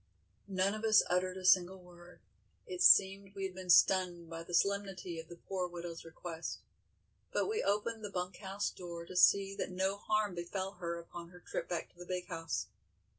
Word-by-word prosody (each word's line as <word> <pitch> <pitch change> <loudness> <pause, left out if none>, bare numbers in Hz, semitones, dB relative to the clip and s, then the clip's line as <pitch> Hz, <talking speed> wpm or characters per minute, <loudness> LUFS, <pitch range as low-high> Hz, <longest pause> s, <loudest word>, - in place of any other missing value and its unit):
None 195 0 +1
of 215 +1 -5
us 220 -2 +6
uttered 185 +1 +1
a 185 - -7
single 185 0 +5
word, 175 -1 -16 0.4
it 370 -5 -6
seemed 195 - +6
we 195 - -4
had 190 - -5
been 185 0 -9
stunned 175 -2 +4
by 165 0 -5
the 170 - -10
solemnity 195 -2 0
of 160 - -9
the 175 - -9
poor 185 +1 -3
widow's 170 -1 -7
request, 165 0 -6 0.7
but - - 0
we 435 +2 0
opened 215 +2 -1
the 205 - -4
bunk 180 -1 -4
house 195 0 -3
door 170 -2 -8
to 185 - -10
see 195 +2 +5
that 200 - -3
no 190 +2 -1
harm 215 -1 0
befell 185 +2 -4
her 170 -3 -4
upon 170 0 -9
her 180 0 -14
trip - - -5
back 175 - -3
to 175 - -25
the 175 - -9
"big" 180 -1 -3
house. 165 -3 -3
185 Hz, 195 wpm, -34 LUFS, 175-195 Hz, 0.7 s, us